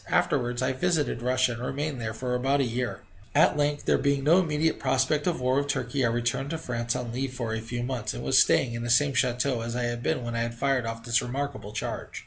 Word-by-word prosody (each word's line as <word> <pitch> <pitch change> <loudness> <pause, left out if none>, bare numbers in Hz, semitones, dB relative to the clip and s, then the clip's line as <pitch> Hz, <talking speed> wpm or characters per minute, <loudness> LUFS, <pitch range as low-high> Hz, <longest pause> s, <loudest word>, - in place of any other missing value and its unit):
Afterwards 120 +1 +1
I 130 - +1
visited 145 -3 0
Russia, 130 0 +2
and 120 0 -6
remained 140 0 -3
there 110 -1 -3
for 125 +1 -3
about 135 +3 +1
a - - +3
year. 125 0 -2 0.3
At 150 - +5
length, 145 0 0
there - - +3
being 140 -1 +1
no 165 +6 +6
immediate 160 -2 0
prospect 135 +4 +1
of 175 - 0
war 130 +1 +1
with 140 0 0
Turkey, 135 -2 -1
I 115 - +3
returned 120 +4 -1
to 165 - -2
France 120 -5 -2
on 120 -2 -3
leave 130 +1 -3
for 115 -3 -3
a 110 - -2
few 120 +2 -4
months, 120 - -3
and - - -6
was - - +4
staying 120 -3 +3
in 115 - -4
the 120 - -3
same 140 +4 +4
chateau 125 -1 +1
as 115 +1 -4
I 125 - -1
had 120 0 -2
been 130 0 -1
when 120 0 -4
I - - 0
had 115 0 -2
fired 130 -1 0
off 115 0 -5
this 120 0 +2
remarkable 135 -4 -4
charge. 110 - -5
125 Hz, 250 wpm, -27 LUFS, 120-140 Hz, 0.3 s, no